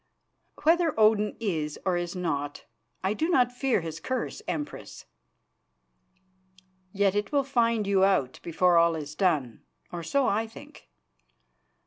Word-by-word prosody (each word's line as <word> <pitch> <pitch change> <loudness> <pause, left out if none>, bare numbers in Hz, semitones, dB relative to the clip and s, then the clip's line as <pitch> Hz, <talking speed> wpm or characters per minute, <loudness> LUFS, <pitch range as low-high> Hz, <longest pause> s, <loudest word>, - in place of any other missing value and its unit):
"Whether 330 -4 +3
Odin 215 -1 +3
is 160 -9 -2
or 185 -2 +2
is 175 +1 -3
not, 145 -5 -3 0.4
I 190 +2 +1
do 320 +9 -1
not 250 -8 +3
fear 250 -4 0
his 165 -1 -6
curse, 260 0 -3
Empress." 295 -1 -6 1.9
"Yet 200 -1 +2
it 205 0 -2
will 285 -2 +2
find 230 -5 +1
you 195 -1 +3
out 185 -10 +1
before 175 +1 +2
all 170 0 +3
is 150 -1 -6
done, 150 - 0 0.3
or 175 - -5
so 270 - +1
I 220 +3 0
think. 220 - -14
195 Hz, 135 wpm, -27 LUFS, 170-240 Hz, 1.9 s, Whether